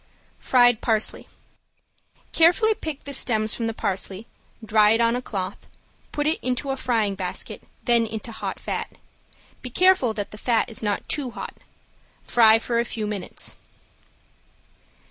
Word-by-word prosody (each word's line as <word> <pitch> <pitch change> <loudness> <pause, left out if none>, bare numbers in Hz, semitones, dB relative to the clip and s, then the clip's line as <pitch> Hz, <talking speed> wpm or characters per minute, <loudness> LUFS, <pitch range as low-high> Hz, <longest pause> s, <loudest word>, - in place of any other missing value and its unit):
~FRIED 245 -3 +4
PARSLEY~ 220 -2 0 1.0
Carefully 355 +7 +4
pick 315 -9 -6
the 280 - -6
stems 220 -4 +2
from 230 - -2
the 225 - -2
parsley, 195 +1 -3 0.4
dry 215 0 +5
it 225 - +1
on 230 0 +3
a 250 - -2
cloth, 190 -6 -5 0.4
put 295 - -2
into 270 -3 -1
a - - -1
frying 225 -6 0
basket, 190 -2 -5 0.2
then 235 -2 +3
into 220 +1 -6
hot 220 - -5
fat. - - -4 0.7
Be 250 - -6
careful 360 -7 +4
that 205 -1 -4
the 210 - -10
fat 235 -1 +1
is 225 - -3
not 205 -2 -2
too 285 -4 -2
hot. - - -7 0.7
Fry 225 -2 +6
for 235 +1 -1
a - - +2
few 225 -2 -4
minutes. 210 -3 -5
230 Hz, 145 wpm, -24 LUFS, 215-255 Hz, 1.0 s, Fry